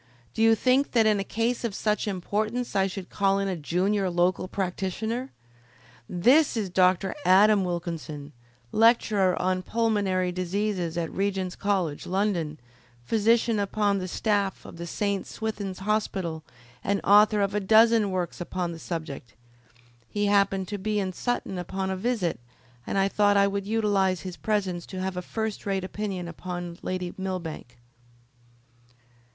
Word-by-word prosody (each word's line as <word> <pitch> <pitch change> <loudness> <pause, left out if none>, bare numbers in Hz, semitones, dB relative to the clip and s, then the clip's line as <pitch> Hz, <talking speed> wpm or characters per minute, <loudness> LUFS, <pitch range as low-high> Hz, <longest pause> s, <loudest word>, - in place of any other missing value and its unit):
"Did - - -2
you 225 0 +6
think 255 +4 +2
that 230 -3 +4
in 210 -2 +3
a - - -1
case 230 +5 -1
of 225 -4 -2
such 210 0 0
importance 215 +5 -2
I 195 -1 +3
should 190 -1 -7
call 195 -1 +2
in 195 0 0
a 190 - -1
junior 185 +5 0
local 175 +1 +1
practitioner! 200 +7 -3 0.8
This 250 - +4
is 200 -5 -2
Dr. 185 +1 +3
Adam 200 +2 +5
Wilkinson, 165 -4 -4 0.4
lecturer 215 -4 +3
on 185 0 0
pulmonary 200 -4 0
diseases 185 -1 -2
at 165 -2 -2
Regent's 190 -2 -1
College, 185 -7 -1
London, 180 -6 -1 0.4
physician 225 - +2
upon 200 0 +1
the 185 - -4
staff 200 0 -1
of - - -10
the 170 0 -6
St. 200 +1 -2
Swithin's 205 -4 -4
Hospital, 190 -5 -2 0.4
and 200 0 +1
author 210 +1 +6
of 200 -1 +1
a 210 - +1
dozen 220 +1 +5
works 180 -2 -3
upon 175 0 -3
the 165 - -8
subject. 160 - -6 0.7
He 205 0 -1
happened 200 -2 +2
to 205 -1 -4
be 210 +2 -1
in 190 -2 -2
Sutton 195 -4 -2
upon 190 +2 -3
a - - -1
visit, 195 - -1 0.5
and - - -1
I 195 0 +3
thought 205 0 +3
I 200 - +5
would 200 0 -2
utilise 205 -4 +1
his 185 -2 -6
presence 190 -5 -2
to 185 - -6
have 190 0 -2
a 180 - -2
first 220 +2 -4
rate 195 -1 0
opinion 190 -2 -4
upon 175 0 -6
Lady 180 -1 -3
Millbank." 170 -10 -5
195 Hz, 155 wpm, -26 LUFS, 180-210 Hz, 0.8 s, you